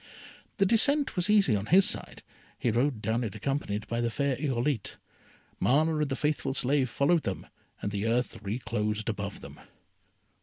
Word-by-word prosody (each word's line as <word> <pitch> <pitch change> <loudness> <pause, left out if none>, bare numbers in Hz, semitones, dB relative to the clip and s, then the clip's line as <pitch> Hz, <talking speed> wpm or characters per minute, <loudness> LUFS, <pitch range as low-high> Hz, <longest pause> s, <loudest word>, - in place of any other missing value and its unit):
The 200 - +3
descent 280 +8 +3
was 180 +2 0
easy 200 - +4
on 100 +1 -3
his 185 +3 +6
side, - - -2 0.3
he 120 - 0
rode 120 0 0
down 115 +2 0
it 110 -3 -5
accompanied 110 -3 -3
by 115 0 -2
the 120 - 0
fair 140 +3 -1
Irolite. 130 -3 -2 0.6
Mana 155 +5 +2
and 150 -2 0
the 135 - -1
faithful 145 -2 -1
slave 135 -1 +1
followed 140 +9 +2
them, 95 -6 -4 0.4
and 100 - -2
the 100 +2 -2
earth 120 +2 -1
reclosed 110 0 -2
above 100 -2 -5
them. - - -11
125 Hz, 165 wpm, -28 LUFS, 110-150 Hz, 0.6 s, his